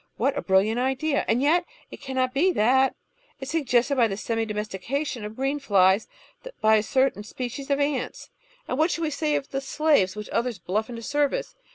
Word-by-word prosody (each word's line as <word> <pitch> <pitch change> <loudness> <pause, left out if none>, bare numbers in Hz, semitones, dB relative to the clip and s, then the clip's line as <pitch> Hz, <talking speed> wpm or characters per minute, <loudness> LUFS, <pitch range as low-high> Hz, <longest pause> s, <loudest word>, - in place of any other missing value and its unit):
What 270 +5 +1
a - - -2
brilliant 200 +5 +2
idea 265 +3 0
— - - -6
^and 240 +4 +2
yet 335 +5 +3 0.3
it - - -10
cannot 260 -2 -1
be 340 +7 +3
thatl 265 0 +3 0.2
— - - -36
^is 270 - -6
suggested 280 -4 +1
by 235 -2 +5
the 195 -2 -4
semi 225 +1 -1
domestication 215 +5 -3
of 210 +1 -7
green 270 +3 -1
flies 195 -5 +3 0.5
by 220 0 +5
a - - +2
certain 260 -2 +1
species 250 +5 -6
of 280 - +2
antsl 280 -3 -2 0.4
and 255 - -2
what 320 +2 +4
shall 335 - -2
we 310 - -1
say 300 0 0
of 275 - -3
the 270 - -2
slaves 275 -9 +2
which 210 0 -6
others 235 -2 -1
bluff 200 +6 -2
into 230 -1 -7
service? 290 - -1
260 Hz, 205 wpm, -25 LUFS, 220-285 Hz, 0.5 s, by